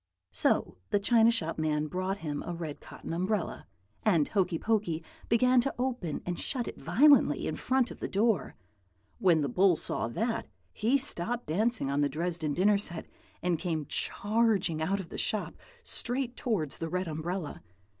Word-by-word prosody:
"So - - +2
the 205 - +2
china 225 +2 +5
shop 165 -9 0
man 155 -1 +1
brought 185 +4 -2
him 145 -1 -2
a 175 - -5
red 160 -3 -5
cotton - - -8
umbrella, 185 +2 -2 0.3
and 170 -9 +3
Hokey 185 -4 +1
Pokey 185 -6 0 0.3
began 250 +2 +5
to 275 - -2
open 245 - -2
and 180 -1 -3
shut 250 -4 -2
it - - -7
violently 255 - +5
in - - -2
front 260 -2 +1
of - - -10
the - - -3
door. 205 - +1 0.6
When 170 -4 +4
the 145 - 0
bull 180 +7 +4
saw 115 - -2
that, 225 - -2 0.3
he 235 +6 +2
stopped 240 -3 -2
dancing 210 - 0
on 140 +1 +1
the 145 - +2
Dresden 160 0 -2
dinner 200 +2 +4
set 175 -5 -3 0.4
and 175 -3 +1
came 160 -4 -2
charging 205 - +1
out 195 +5 0
of 175 -4 -7
the - - -5
shop, 215 - -2 0.3
straight 250 - -2
towards 190 - -1
the 165 - -3
red 180 +2 -1
umbrella. 160 +1 -4
185 Hz, 170 wpm, -30 LUFS, 160-225 Hz, 0.6 s, china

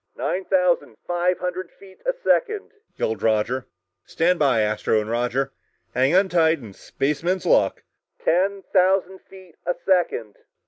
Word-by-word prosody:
"Nine 185 +1 -2
thousand 180 - +1
five 175 +1 +1
hundred 180 0 -4
feet 190 -1 -18
a - - +2
second," 435 -4 +1 0.2
yelled 110 -2 -2
Roger. 115 +4 0 0.4
"Stand 175 +2 +1
by, 135 -7 +3
Astro, 105 +1 +1
Roger! 120 +4 -1 0.4
Hang 130 +6 +2
on 190 +1 +5
tight, 165 -3 +3
and 110 -8 -12
spaceman's 170 +6 -2
luck!" - - +2 0.4
"Ten 195 +3 +1
thousand 190 0 +2
feet 185 -4 -15
a 175 - -1
second!" 170 - +1
175 Hz, 135 wpm, -23 LUFS, 125-185 Hz, 0.4 s, on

